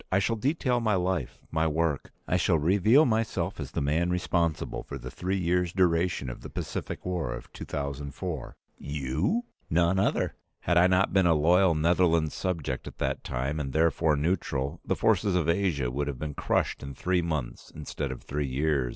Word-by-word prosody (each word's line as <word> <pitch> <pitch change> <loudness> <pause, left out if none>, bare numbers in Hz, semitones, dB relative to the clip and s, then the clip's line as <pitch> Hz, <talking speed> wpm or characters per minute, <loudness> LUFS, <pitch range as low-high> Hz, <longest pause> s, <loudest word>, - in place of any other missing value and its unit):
I 95 - +4
shall 100 +4 +1
detail 130 +1 +1
my 110 -3 +1
life, 90 -9 -1
my 80 0 +1
work. 80 -2 -1 0.2
I - - +1
shall 85 -1 +3
reveal 100 - +4
myself 110 -2 -1
as - - -4
the - - -2
man 80 +5 +1
responsible 85 -2 0
for - - -7
the - - -8
three 95 +2 -2
years' 90 -1 +1
duration 85 -5 +2
of - - -6
the - - -8
Pacific - - -5
War 90 -8 -2
of 65 - -11
2004." 70 +2 -5 0.2
"You?" 75 - -1 0.3
"None 85 +3 +3
other. - - +1 0.3
Had 85 - +1
I 90 - +6
not 95 +1 +2
been 95 -2 +4
a 85 - +5
loyal 85 +3 +4
Netherlands 85 -1 +2
subject 80 -8 -3
at - - -9
that - - -2
time, 65 +5 -2
and 70 -3 -4
therefore 80 -1 +3
neutral, 70 -3 -1
the - - 0
forces 100 -3 +2
of 85 -4 +1
Asia 85 -8 +1
would 70 +3 -2
have 70 -3 -3
been 75 +1 -4
crushed - - 0
in 70 -1 -7
three 90 +4 +1
months 75 -7 -4
instead 75 -2 -4
of 65 - -8
three 75 0 -2
years. 70 -1 0
85 Hz, 185 wpm, -28 LUFS, 70-90 Hz, 0.3 s, I